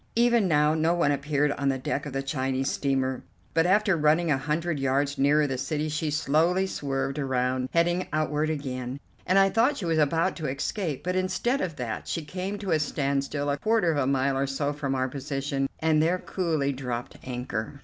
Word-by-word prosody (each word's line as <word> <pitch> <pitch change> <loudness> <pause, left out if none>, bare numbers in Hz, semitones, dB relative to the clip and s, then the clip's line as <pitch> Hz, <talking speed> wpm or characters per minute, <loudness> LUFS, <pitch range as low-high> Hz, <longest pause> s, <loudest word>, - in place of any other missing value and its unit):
Even 235 -3 +4
now 150 -2 +3
no 160 +2 +2
one 170 -4 +2
appeared 145 +1 +1
on 140 -1 0
the 135 - 0
deck 140 +2 -3
of 140 - -7
the 135 0 -2
Chinese 135 -1 -1
steamer, 130 -2 0 0.3
but 165 +1 +3
after 200 0 +3
running 155 +1 +3
a 140 - +3
hundred 155 +2 -1
yards 140 +1 0
nearer 145 +2 +4
the 135 -3 -2
city 150 +3 -2
she 155 +1 -1
slowly 160 +5 +2
swerved 140 -4 -2
around, 130 -1 0
heading 175 +2 +1
outward 155 0 0
again, 130 -3 -4 0.3
and 185 +2 +3
I 195 0 +5
thought 250 +7 +3
she 185 - -4
was 165 -1 +1
about 165 +5 +2
to 160 -3 -3
escape; 145 +3 -3
but 180 +1 -1
instead 185 +8 0
of 170 -4 -3
that 120 -4 -4
she 165 - -3
came 185 +5 -4
to 200 -3 -4
a 160 - +3
standstill 140 0 -1
a 140 - -1
quarter 215 -4 +2
of 155 - -1
a 130 - +1
mile 135 0 +1
or 135 +1 0
so 140 +2 -1
from 140 -2 -2
our 130 0 0
position 135 0 -2
and 155 -1 +2
there 170 +3 +2
coolly 160 -7 -1
dropped 125 -2 -5
anchor. 125 0 -4
150 Hz, 200 wpm, -27 LUFS, 135-170 Hz, 0.3 s, I